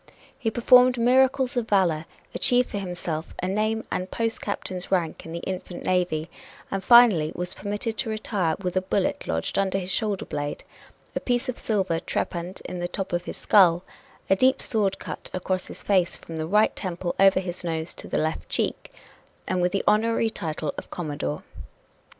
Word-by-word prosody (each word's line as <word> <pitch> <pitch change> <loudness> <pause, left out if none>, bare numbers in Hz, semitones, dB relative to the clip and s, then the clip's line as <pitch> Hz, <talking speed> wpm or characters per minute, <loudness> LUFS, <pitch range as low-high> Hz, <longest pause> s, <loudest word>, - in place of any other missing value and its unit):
He 235 -4 0
performed 250 +2 +5
miracles 260 +2 +3
of 240 -2 -1
valor 170 -6 +2 0.3
achieved 250 0 +2
for 205 - -2
himself 175 -4 -4
a 185 - -2
name 215 +3 0
and 185 - -1
a - - -18
post 225 +3 -1
captain's 185 -3 -4
rank 170 -4 -1
in - - -8
the 170 +1 -5
infant 185 -1 -5
navy 175 -4 +1 0.4
and 195 0 -2
finally 210 -10 +6
was 180 0 -3
permitted 205 +3 -3
to 240 - -1
retire 205 -6 -1
with 180 -2 -4
a 185 - +3
bullet 190 0 -1
lodged 80 - -1
under 195 -1 +1
his 185 -1 -4
shoulder 210 -2 -1
blade, 145 0 -4 0.5
a - - +1
piece 245 +1 -1
of 250 - -3
silver 190 -6 0
trepanned 175 +1 -3
in 180 - -5
the 175 - -1
top 190 +1 -5
of 175 0 -1
his - - -6
skull, 180 -4 +5 0.4
a 195 - +4
deep 260 +6 +3
sword 200 -4 +1
cut - - -7
across 185 0 -2
his - - -7
face 185 -4 +2
from 165 - -9
the 160 0 -3
right 210 +5 +3
temple 175 -2 -3
over 195 -1 +6
his 180 -1 -5
nose 165 -1 -3
to - - -8
the - - -1
left 155 +1 -2
cheek - - -2 0.6
and 185 -1 0
with 180 0 +2
the 195 - 0
honorary 225 +1 +2
title 155 -6 -3
of - - -12
commodore. 145 - -4
190 Hz, 185 wpm, -25 LUFS, 175-220 Hz, 0.6 s, finally